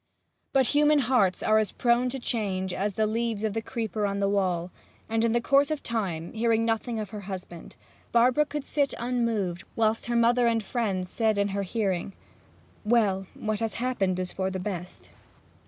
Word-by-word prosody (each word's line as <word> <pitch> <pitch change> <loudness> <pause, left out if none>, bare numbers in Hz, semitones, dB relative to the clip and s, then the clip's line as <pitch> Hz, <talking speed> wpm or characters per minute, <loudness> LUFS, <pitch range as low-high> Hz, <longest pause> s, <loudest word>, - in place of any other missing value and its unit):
But 265 -2 +3
human 300 +1 +5
hearts 245 -9 +2
are 215 0 +4
as 215 - 0
prone 240 +1 +2
to 265 - -4
change 195 -7 -2
as 200 +1 -2
the 220 - +2
leaves 225 -1 -1
of 215 -2 0
the 225 - -1
creeper 220 -3 -2
on 200 0 -2
the 200 0 +1
wall, 185 -3 0 0.4
and 225 0 0
in 230 - +3
the 240 - +2
course 275 +4 +3
of 310 -2 -3
time, 185 -8 -3
hearing 225 0 +2
nothing 225 0 -1
of 210 -2 -5
her 210 - -6
husband, 180 -3 -8 0.4
Barbara 250 +5 +4
could 295 -2 -4
sit 285 -2 0
unmoved 230 -7 -1
whilst 225 0 +1
her 240 - -1
mother 235 +1 +4
and 230 -1 +1
friends 195 -6 -1
said 220 +2 0
in 200 0 +1
her 200 +1 -2
hearing, 195 -2 -2 0.7
'Well, 210 -4 +2
what 215 -1 -2
has 225 -3 -2
happened 215 -7 0
is 185 -1 -3
for 190 0 -1
the 190 0 -4
best.' 180 -2 -6
220 Hz, 190 wpm, -27 LUFS, 195-235 Hz, 0.7 s, human